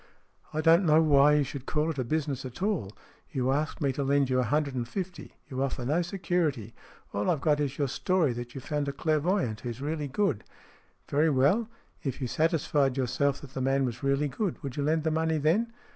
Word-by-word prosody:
" - - -41
I 155 - -1
don't 165 +4 +5
know 155 -2 +5
why 150 -2 +5
you 150 -1 +4
should 135 0 -7
call 155 +1 0
it 130 -6 -3
business 145 -4 -1
at 130 +6 -7
all. 195 - -1 0.4
You 130 -5 0
ask 150 +3 -1
me 140 -2 +2
to 140 - -2
lend 140 -1 +2
you 130 - +3
a - - +3
hundred 145 +3 0
and 120 -2 -3
fifty. 185 +5 -6
You 130 -2 -4
offer 130 -2 -2
no 155 +7 +2
security. 170 - -1 0.4
All 100 +1 0
I've 160 - +2
got 150 -1 +2
is 140 -2 -2
your 145 - +1
story 165 0 +1
that 120 +1 -7
you've 135 - -6
found 150 -2 -2
a 140 - -2
clairvoyant 155 - 0
who's 120 0 -6
really 150 +1 -2
good." 150 - 0 0.6
"Very 150 +3 +2
well. 150 - +2 0.3
If 135 -2 -3
you 130 - -2
satisfied 145 -2 +1
yourself 140 +2 0
that 140 -2 -12
the 130 - -3
man 135 +1 +2
was 120 -2 -4
really 140 +2 +1
good, 190 +7 -2
would 135 -3 -5
you 145 - -2
lend 155 +2 +1
the 160 - +1
money 160 0 +1
then?" 175 +11 +1
145 Hz, 220 wpm, -28 LUFS, 130-160 Hz, 0.6 s, don't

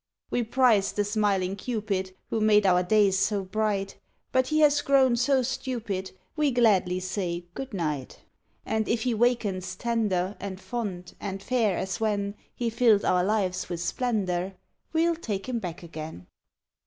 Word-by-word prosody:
We 245 - +1
prized 235 -4 +3
the 205 - +2
smiling 200 -3 +1
Cupid 200 -4 -3 0.2
Who 225 - 0
made 210 -1 +5
our 180 -1 +5
days 195 0 +3
so 200 0 +1
bright; 200 0 -2 0.3
But 260 0 +2
he 310 +2 +2
has 295 -1 +5
grown 265 -4 +4
so 260 +2 +2
stupid 230 -7 -3 0.3
We 300 -2 +2
gladly 205 -8 +3
say 180 -2 -3
good 270 +5 -6
night. 150 - -3 0.5
And 220 -1 -1
if 230 -1 +1
he 250 -2 +1
wakens 210 -6 0
tender 210 -4 0
And 190 -2 -6
fond, 195 -6 -5
and 195 -1 -5
fair 230 -7 +1
as 190 -2 -3
when 205 -2 0 0.2
He 235 -2 -1
filled 225 -3 +4
our 180 -1 +3
lives 190 -2 0
with 175 -2 -3
splendor, 190 -2 -1 0.4
We'll 335 +1 +2
take 210 - -4
him 245 -2 -1
back 175 -4 -6
again. 155 - -8
205 Hz, 155 wpm, -27 LUFS, 185-235 Hz, 0.5 s, made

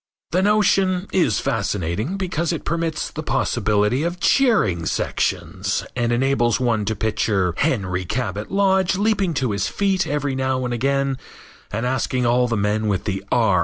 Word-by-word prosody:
The 180 - +2
notion 195 -2 +2
is 185 - +2
fascinating 110 - -2
because 175 -3 -1
it 165 - -4
permits 165 -1 -2
the 155 - -5
possibility 115 -4 +1
of 175 +2 -2
cheering 175 - +2
sections - - -1
and 120 0 0
enables 120 -2 +2
one 115 -4 +1
to 110 +2 -1
picture 100 -4 0
Henry 100 - 0
Cabot 105 0 -3
Lodge 190 -2 +2
leaping 200 -4 +1
to 125 -4 0
his 100 0 -1
feet 195 - 0
every 145 -1 -1
now 130 -1 -1
and 120 - -2
again 135 +2 0 0.5
and 115 +4 -2
asking 125 0 0
all 125 +1 +3
the 115 -2 -1
men 105 +2 0
with 100 -3 0
the 95 -2 -3
R. 110 -7 +3
130 Hz, 160 wpm, -21 LUFS, 105-170 Hz, 0.5 s, all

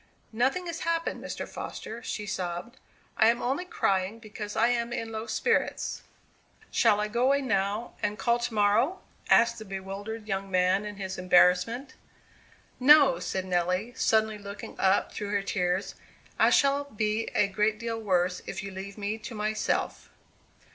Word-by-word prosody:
"Nothing 265 +11 +1
has 335 -1 -4
happened, 335 0 -2
Mr. - - -5
Foster," 230 +2 -7
she 210 -2 -4
sobbed. 185 +5 -4 0.4
"I 220 - +5
am 235 +1 +3
only 270 +10 -1
crying 195 - 0
because 210 -2 -7
I 230 +2 +3
am 235 -1 0
in 225 -1 -4
low 220 +1 -5
spirits." 460 - 0 0.7
"Shall 205 - +4
I 210 - 0
go 235 +4 0
away 280 +1 +3
now, 205 0 -1
and 210 0 -1
call 235 +1 +1
to 240 - -2
morrow?" 215 - +2 0.3
asked 235 0 +4
the - - -7
bewildered 195 +3 -6
young 195 -1 -2
man 185 +2 +2
in 210 0 -6
his 190 -2 -5
embarrassment. 185 +8 +3 0.9
"No," 275 0 +7
said 190 -1 -3
Nelly, 185 +5 0
suddenly 220 -3 +2
looking 200 0 -8
up 190 +1 +2
through 205 - -5
her 200 -1 0
tears; 190 -1 -1 0.5
"I - - +6
shall 280 0 +3
be 215 -3 -1
a 200 - +4
great 210 +2 0
deal 230 0 -4
worse 180 -3 +1
if - - -5
you 200 - -6
leave 195 +2 -8
me 210 +2 -3
to 230 +2 -8
myself!" 215 +1 -1
215 Hz, 160 wpm, -28 LUFS, 195-235 Hz, 0.9 s, No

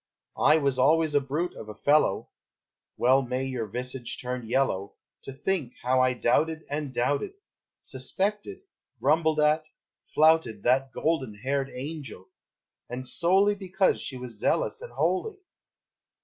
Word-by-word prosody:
I 150 - +6
was 140 -4 0
always 155 +3 +3
a 145 - +4
brute 150 +6 -2
of 110 - -10
a 105 - -8
fellow! 145 -3 +2 0.7
Well 130 +3 +4
may 130 0 -2
your 130 -4 -3
visage 125 +3 -4
turn 125 -2 -5
yellow, 120 -7 0 0.3
To - - -6
think 140 -1 -2
how 130 +1 +3
I 130 0 +3
doubted 160 +6 +1
and 145 -1 -3
doubted, 140 - -1 0.5
Suspected, 210 - -2 0.4
grumbled 160 -1 +2
at, 155 +1 +2 0.5
flouted 155 -9 +3
That 130 +2 +2
golden 135 -9 -1
haired 135 +5 -2
angel, 135 - -7 0.6
and 125 +1 -5
solely 190 +7 +4
Because 190 -1 0
she 130 - -4
was 125 -4 -8
zealous - - 0
and - - -9
holy! 180 - -1
135 Hz, 135 wpm, -27 LUFS, 125-160 Hz, 0.7 s, I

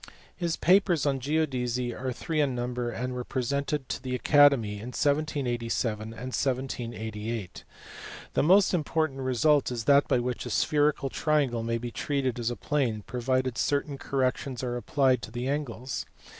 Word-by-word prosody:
His 170 -2 -1
papers 180 -4 +3
on 140 -2 +1
geodesy 125 -4 -1
are 130 +2 -3
three 155 +5 -1
in 135 -3 +1
number 120 0 -2
and 125 +2 -3
were 125 0 -3
presented 140 +2 -2
to - - -3
the 130 -1 -3
Academy 130 -7 +4
in 110 - -7
1787 125 -7 0
and 110 - -7 0.2
1788. 115 -5 -3 0.7
The - - +2
most 190 +6 +5
im 170 -4 +1
portant 155 -3 -1
result 130 +2 +2
is 120 -2 -3
that 140 +4 +5
by - - +3
which 125 0 -2
a - - -5
spherical 145 -2 +1
triangle 145 -7 +1
may 115 +1 -1
be 120 0 -5
treated 130 -2 -1
as 120 0 -1
plane, 125 -8 0
provided 130 0 -1
certain 140 -1 0
corrections 130 -1 -1
are 120 -1 -2
applied 130 0 +2
to - - -7
the 120 +1 -4
angles. 135 -3 -3
130 Hz, 155 wpm, -28 LUFS, 120-145 Hz, 0.7 s, most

